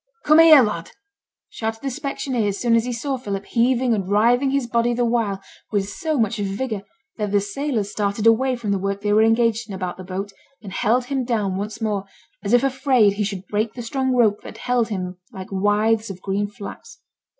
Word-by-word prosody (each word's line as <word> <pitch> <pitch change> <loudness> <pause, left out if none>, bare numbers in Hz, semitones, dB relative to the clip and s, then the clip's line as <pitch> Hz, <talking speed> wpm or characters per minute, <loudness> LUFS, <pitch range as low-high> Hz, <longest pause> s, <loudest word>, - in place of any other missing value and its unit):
'Come 305 +2 +6
here, 315 -5 +9
lad!' 190 -7 -3 0.6
shouted 225 +1 -4
the 270 - -2
specksioneer 265 -5 -2
as 200 -1 -2
soon 235 -2 +3
as 230 0 +2
he 250 - -2
saw 265 +3 -2
Philip, 200 -5 -5
heaving 245 0 +2
and 195 -3 -2
writhing 240 +6 +3
his 275 -1 0
body 235 0 +1
the 240 0 +1
while 230 -5 0 0.3
with 200 -2 0
so 310 +8 -2
much 225 -1 +1
vigour 205 +2 -3 0.4
that 210 -2 -2
the 205 - +4
sailors 210 +1 -2
started 205 +1 -2
away 250 +3 +4
from 230 -4 -3
the 200 - +1
work 195 +1 -2
they 205 0 +1
were 215 - +5
engaged 225 0 +2
in 195 - -5
about 185 -2 -4
the 185 - -8
boat, 190 +2 -5 0.3
and 195 -3 -8
held 245 +4 +1
him 270 0 -1
down 215 -6 -1
once 210 +3 -5
more, 205 -3 -1 0.4
as 200 - -2
if 245 +1 +5
afraid 260 -6 +3
he 210 +1 -1
should 195 -2 -4
break 215 +1 -2
the 240 - -6
strong 260 +2 -1
rope 215 -4 +3
that - - -10
held 245 -2 0
him 185 -3 -4
like 190 0 -9
withes 210 +3 +1
of 190 -2 -7
green 200 +2 -1
flax. 210 - -10
220 Hz, 210 wpm, -22 LUFS, 200-245 Hz, 0.6 s, here